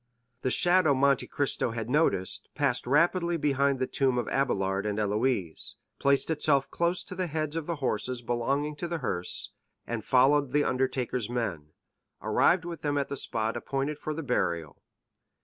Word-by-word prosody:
The 130 Hz, -, 0 dB
shadow 175 Hz, 0 st, +4 dB
Monte 140 Hz, 0 st, +2 dB
Cristo 140 Hz, -3 st, 0 dB
had 115 Hz, -2 st, -4 dB
noticed 125 Hz, -, 0 dB
passed -, -, 0 dB
rapidly 170 Hz, +4 st, +2 dB
behind 140 Hz, -2 st, +1 dB
the 130 Hz, -, 0 dB
tomb 130 Hz, -1 st, +1 dB
of 120 Hz, -, 0 dB
Abélard 95 Hz, -7 st, 0 dB
and 105 Hz, 0 st, -2 dB
Héloïse, 105 Hz, -4 st, -1 dB, 0.2 s
placed 140 Hz, +3 st, +2 dB
itself 145 Hz, -3 st, +1 dB
close 170 Hz, +1 st, +1 dB
to 190 Hz, -, -9 dB
the 185 Hz, -1 st, -2 dB
heads 155 Hz, -1 st, -2 dB
of 165 Hz, -2 st, -3 dB
the 170 Hz, -, -1 dB
horses 125 Hz, -2 st, -2 dB
belonging 140 Hz, +6 st, -1 dB
to 175 Hz, -, -3 dB
the 170 Hz, 0 st, -2 dB
hearse, 90 Hz, -, -1 dB, 0.3 s
and 115 Hz, -2 st, -4 dB
following 135 Hz, +1 st, +3 dB
the 145 Hz, 0 st, +4 dB
undertaker's 130 Hz, -3 st, -1 dB
men, 90 Hz, -11 st, -3 dB, 0.5 s
arrived 180 Hz, -1 st, +2 dB
with 170 Hz, -3 st, -6 dB
them 145 Hz, -1 st, 0 dB
at 140 Hz, -, -1 dB
the 140 Hz, -, -3 dB
spot 115 Hz, -3 st, -1 dB
appointed 135 Hz, +4 st, -2 dB
for 155 Hz, -, -4 dB
the 165 Hz, -, -4 dB
burial. 85 Hz, -, -1 dB
135 Hz, 165 wpm, -28 LUFS, 120-150 Hz, 0.5 s, shadow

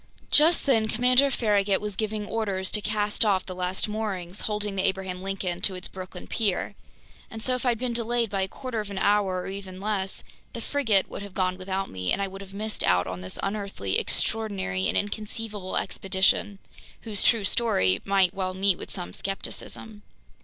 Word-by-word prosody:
Just 320 Hz, +3 st, +6 dB
then 225 Hz, -6 st, +4 dB
Commander 250 Hz, +5 st, +4 dB
Farragut 205 Hz, -6 st, +2 dB
was 210 Hz, -2 st, -3 dB
giving 215 Hz, 0 st, -2 dB
orders 200 Hz, -4 st, -1 dB
to 210 Hz, -, +4 dB
cast 210 Hz, +1 st, +1 dB
off 195 Hz, -4 st, +2 dB
the 185 Hz, -, -6 dB
last 180 Hz, +2 st, -2 dB
moorings 205 Hz, -4 st, -3 dB
holding 210 Hz, -1 st, -2 dB
the 190 Hz, -, +1 dB
Abraham 190 Hz, -1 st, -1 dB
Lincoln 190 Hz, -2 st, -3 dB
to 190 Hz, -, +3 dB
its 180 Hz, -, -4 dB
Brooklyn 185 Hz, -1 st, -8 dB
pier. 205 Hz, -5 st, 0 dB, 0.6 s
And 225 Hz, 0 st, -8 dB
so 255 Hz, -, +1 dB
if 250 Hz, 0 st, -1 dB
I'd 240 Hz, -1 st, +3 dB
been 245 Hz, +1 st, -1 dB
delayed 235 Hz, -1 st, 0 dB
by 195 Hz, -1 st, 0 dB
a 190 Hz, -, +1 dB
quarter 255 Hz, +2 st, -5 dB
of 210 Hz, -1 st, -4 dB
an 200 Hz, -, -6 dB
hour 195 Hz, -2 st, +2 dB
or -, -, -6 dB
even 190 Hz, -1 st, -7 dB
less, 195 Hz, -2 st, -1 dB, 0.3 s
the -, -, -5 dB
frigate 225 Hz, -8 st, +2 dB
would -, -, -7 dB
have 200 Hz, -2 st, -9 dB
gone 185 Hz, -1 st, +1 dB
without 190 Hz, +1 st, -3 dB
me, 90 Hz, -1 st, -2 dB
and -, -, +2 dB
I 200 Hz, -, 0 dB
would 195 Hz, +1 st, -9 dB
have 195 Hz, -1 st, -10 dB
missed 215 Hz, +2 st, -3 dB
out 90 Hz, 0 st, +3 dB
on 90 Hz, 0 st, -5 dB
this 90 Hz, 0 st, -5 dB
unearthly, 195 Hz, -, -1 dB
extraordinary, 195 Hz, -, 0 dB
and -, -, +1 dB
inconceivable 210 Hz, -1 st, -3 dB
expedition, 195 Hz, +1 st, +1 dB, 0.4 s
whose 210 Hz, -4 st, -3 dB
true 230 Hz, -3 st, +4 dB
story 95 Hz, -, +3 dB
might 195 Hz, -2 st, +3 dB
well 185 Hz, -2 st, -2 dB
meet 190 Hz, -1 st, +2 dB
with -, -, -7 dB
some 90 Hz, +1 st, -4 dB
skepticism. 205 Hz, -, -4 dB
200 Hz, 190 wpm, -27 LUFS, 185-215 Hz, 0.6 s, Just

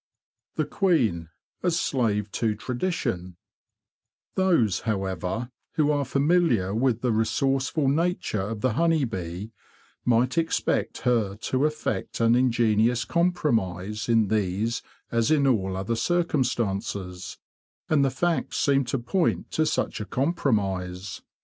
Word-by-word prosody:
The -, -, 0 dB
Queen 120 Hz, -, +1 dB, 0.3 s
a 180 Hz, -, +2 dB
Slave 110 Hz, -, 0 dB
to 110 Hz, -2 st, 0 dB
Tradition 120 Hz, -, -3 dB, 1.0 s
Those, 165 Hz, -, +2 dB
however, 95 Hz, +2 st, -2 dB, 0.2 s
who 150 Hz, -1 st, +2 dB
are 145 Hz, -1 st, 0 dB
familiar 140 Hz, -, +2 dB
with 120 Hz, 0 st, +1 dB
the 125 Hz, -, +1 dB
re 110 Hz, 0 st, +2 dB
sourceful 135 Hz, +4 st, 0 dB
nature 160 Hz, -, 0 dB
of 105 Hz, +2 st, -4 dB
the 130 Hz, -1 st, +1 dB
honey 165 Hz, +2 st, +2 dB
bee 95 Hz, -1 st, -5 dB, 0.5 s
might 125 Hz, +6 st, +2 dB
expect 165 Hz, 0 st, -1 dB
her 115 Hz, -6 st, +1 dB
to 130 Hz, +6 st, 0 dB
effect 150 Hz, -10 st, -3 dB
an 115 Hz, 0 st, +4 dB
ingenious 120 Hz, -2 st, +2 dB
compromise 110 Hz, -, 0 dB
in 115 Hz, -3 st, +3 dB
these 110 Hz, +2 st, 0 dB, 0.3 s
as 115 Hz, +1 st, +1 dB
in 150 Hz, -3 st, +3 dB
all 95 Hz, -8 st, +1 dB
other 100 Hz, +5 st, -1 dB
circumstances; 110 Hz, -, -1 dB, 0.5 s
and 150 Hz, -3 st, +3 dB
the 135 Hz, -, +3 dB
facts 170 Hz, +6 st, -1 dB
seem 140 Hz, -2 st, +3 dB
to 130 Hz, +3 st, -1 dB
point 170 Hz, +9 st, -1 dB
to 155 Hz, 0 st, +1 dB
such -, -, -1 dB
a -, -, -4 dB
compromise. 100 Hz, -, -1 dB
115 Hz, 125 wpm, -26 LUFS, 100-140 Hz, 1.0 s, an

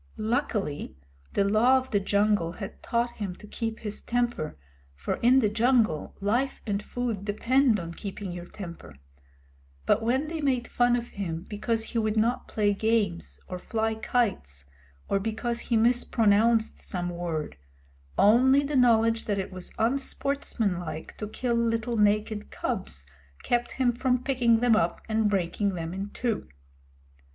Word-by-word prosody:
Luckily, 205 Hz, -, -2 dB, 0.4 s
the -, -, +3 dB
Law 220 Hz, +6 st, +4 dB
of 260 Hz, 0 st, -4 dB
the 205 Hz, -, +3 dB
Jungle 200 Hz, -3 st, +1 dB
had 195 Hz, +1 st, -8 dB
taught 235 Hz, 0 st, -1 dB
him 195 Hz, -4 st, -4 dB
to -, -, -13 dB
keep 225 Hz, +1 st, -4 dB
his 210 Hz, -2 st, -4 dB
temper, 240 Hz, -, -1 dB, 0.4 s
for 70 Hz, -, -3 dB
in 250 Hz, +3 st, +5 dB
the 215 Hz, -, +3 dB
jungle 225 Hz, -, +1 dB
life 240 Hz, +7 st, 0 dB
and 205 Hz, -2 st, -1 dB
food 230 Hz, -3 st, -3 dB
depend 230 Hz, +3 st, +2 dB
on 170 Hz, -1 st, -6 dB
keeping 200 Hz, 0 st, -6 dB
your 175 Hz, 0 st, -7 dB
temper; 170 Hz, -, -9 dB, 0.9 s
but 215 Hz, -, +3 dB
when 255 Hz, +6 st, +1 dB
they 320 Hz, 0 st, -4 dB
made 255 Hz, -4 st, +1 dB
fun 245 Hz, 0 st, +3 dB
of 240 Hz, 0 st, -3 dB
him 170 Hz, -5 st, -4 dB
because 220 Hz, +2 st, -1 dB
he 230 Hz, -, -2 dB
would 215 Hz, 0 st, 0 dB
not 240 Hz, +3 st, +1 dB
play 205 Hz, -1 st, +1 dB
games 210 Hz, -4 st, 0 dB
or 180 Hz, -, -5 dB
fly 220 Hz, +3 st, -1 dB
kites, 205 Hz, -, -1 dB, 0.4 s
or 195 Hz, -, +1 dB
because 225 Hz, +3 st, -2 dB
he 235 Hz, -1 st, 0 dB
mispronounced 225 Hz, -1 st, +3 dB
some 175 Hz, -2 st, -3 dB
word, 170 Hz, -3 st, -3 dB, 0.6 s
only 260 Hz, +7 st, +5 dB
the 290 Hz, +1 st, -2 dB
knowledge 230 Hz, -2 st, +4 dB
that 205 Hz, -2 st, 0 dB
it 195 Hz, -, -3 dB
was 185 Hz, -1 st, -6 dB
unsportsmanlike 225 Hz, -, -1 dB
to 210 Hz, -, -3 dB
kill 240 Hz, +3 st, -2 dB
little 230 Hz, 0 st, 0 dB
naked 210 Hz, 0 st, +1 dB
cubs 65 Hz, +2 st, -4 dB, 0.4 s
kept 240 Hz, 0 st, 0 dB
him 250 Hz, -2 st, +2 dB
from 250 Hz, +1 st, 0 dB
picking 240 Hz, -4 st, +3 dB
them 245 Hz, -2 st, +5 dB
up 220 Hz, -, +1 dB
and 220 Hz, -1 st, +2 dB
breaking 195 Hz, +1 st, 0 dB
them 165 Hz, 0 st, -4 dB
in 195 Hz, +2 st, -4 dB
two. 230 Hz, -1 st, -2 dB
220 Hz, 155 wpm, -27 LUFS, 200-240 Hz, 0.9 s, in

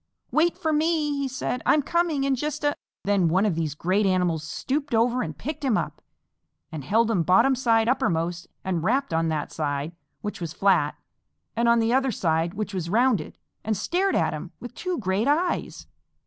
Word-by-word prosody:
"Wait 330 Hz, +2 st, +2 dB
for 315 Hz, -1 st, 0 dB
me," 305 Hz, -1 st, +1 dB
he 280 Hz, -1 st, -1 dB
said. 255 Hz, -1 st, -3 dB
"I'm 295 Hz, -, +3 dB
coming 340 Hz, -4 st, +1 dB
in 275 Hz, 0 st, +2 dB
just 295 Hz, +3 st, -3 dB
a 290 Hz, 0 st, +2 dB, 0.2 s
" -, -, -69 dB
Then 200 Hz, -3 st, +3 dB
one 185 Hz, +5 st, +2 dB
of 205 Hz, -, +2 dB
these 160 Hz, -3 st, -2 dB
great 190 Hz, +6 st, +1 dB
animals 180 Hz, -4 st, +1 dB
stooped 275 Hz, -, -2 dB
over 240 Hz, +2 st, +2 dB
and 155 Hz, -3 st, -5 dB
picked 295 Hz, -, -5 dB
him 250 Hz, -6 st, +2 dB
up, -, -, -4 dB, 0.7 s
and 155 Hz, -3 st, -6 dB
held 225 Hz, -, +2 dB
him 190 Hz, -6 st, +2 dB
bottom 225 Hz, -, +4 dB
side 230 Hz, -3 st, +2 dB
uppermost 170 Hz, -8 st, 0 dB, 0.2 s
and 180 Hz, -4 st, -1 dB
rapped 255 Hz, +1 st, +1 dB
on 165 Hz, 0 st, +1 dB
that 155 Hz, -2 st, -2 dB
side, 145 Hz, 0 st, -2 dB, 0.3 s
which 210 Hz, -3 st, -5 dB
was 165 Hz, -2 st, -4 dB
flat; 180 Hz, -6 st, +2 dB, 0.6 s
and 235 Hz, +1 st, +2 dB
on 235 Hz, -, +5 dB
the 230 Hz, +1 st, +2 dB
other 265 Hz, 0 st, +2 dB
side, 165 Hz, -3 st, 0 dB
which 210 Hz, 0 st, -4 dB
was 175 Hz, -3 st, -3 dB
rounded; 225 Hz, -5 st, +1 dB, 0.3 s
and 215 Hz, -1 st, -1 dB
stared 365 Hz, -, 0 dB
at -, -, +1 dB
him -, -, -6 dB
with -, -, -8 dB
two 365 Hz, -1 st, -3 dB
great 195 Hz, +1 st, 0 dB
eyes. 335 Hz, +5 st, 0 dB
220 Hz, 195 wpm, -25 LUFS, 170-275 Hz, 0.7 s, on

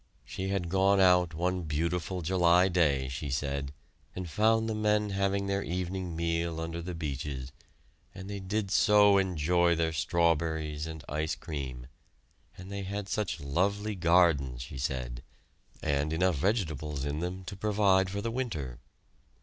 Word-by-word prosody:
She 95 Hz, -, -4 dB
had 95 Hz, -3 st, -1 dB
gone 95 Hz, +1 st, +4 dB
out 90 Hz, -3 st, +4 dB
one 90 Hz, +2 st, 0 dB
beautiful 85 Hz, +4 st, -2 dB
July 90 Hz, +1 st, +4 dB
day, 75 Hz, -7 st, +2 dB
she 70 Hz, +3 st, -5 dB
said, 70 Hz, 0 st, -2 dB, 0.4 s
and 90 Hz, -1 st, -4 dB
found 110 Hz, +6 st, +2 dB
the 110 Hz, -, -1 dB
men 105 Hz, -1 st, +1 dB
having 100 Hz, 0 st, 0 dB
their 100 Hz, 0 st, 0 dB
evening 90 Hz, -1 st, -3 dB
meal 85 Hz, 0 st, -1 dB
under 80 Hz, +1 st, -4 dB
the 90 Hz, +1 st, -5 dB
beeches, 70 Hz, -4 st, -4 dB, 0.6 s
and 95 Hz, 0 st, -8 dB
they 100 Hz, 0 st, -5 dB
did 100 Hz, +1 st, -2 dB
so 105 Hz, -1 st, +6 dB
enjoy 85 Hz, -1 st, +2 dB
their 80 Hz, 0 st, 0 dB
strawberries 80 Hz, -2 st, 0 dB
and 80 Hz, -2 st, -8 dB
ice 80 Hz, +2 st, -2 dB
cream; 65 Hz, -6 st, -6 dB, 0.7 s
and 95 Hz, +2 st, -10 dB
they 100 Hz, 0 st, -4 dB
had 100 Hz, +1 st, -4 dB
such 105 Hz, -6 st, -2 dB
lovely 100 Hz, +9 st, 0 dB
gardens, 85 Hz, -9 st, +3 dB
she 65 Hz, -, -8 dB
said, 60 Hz, -2 st, -3 dB, 0.6 s
and 70 Hz, +1 st, 0 dB
enough 90 Hz, 0 st, +2 dB
vegetables 75 Hz, -, -1 dB
in 70 Hz, +1 st, -2 dB
them 90 Hz, +2 st, -4 dB
to 100 Hz, -, -6 dB
provide 100 Hz, -2 st, +2 dB
for 100 Hz, +1 st, -3 dB
the 115 Hz, +2 st, -2 dB
winter. 80 Hz, -, -4 dB
85 Hz, 150 wpm, -30 LUFS, 75-95 Hz, 0.7 s, so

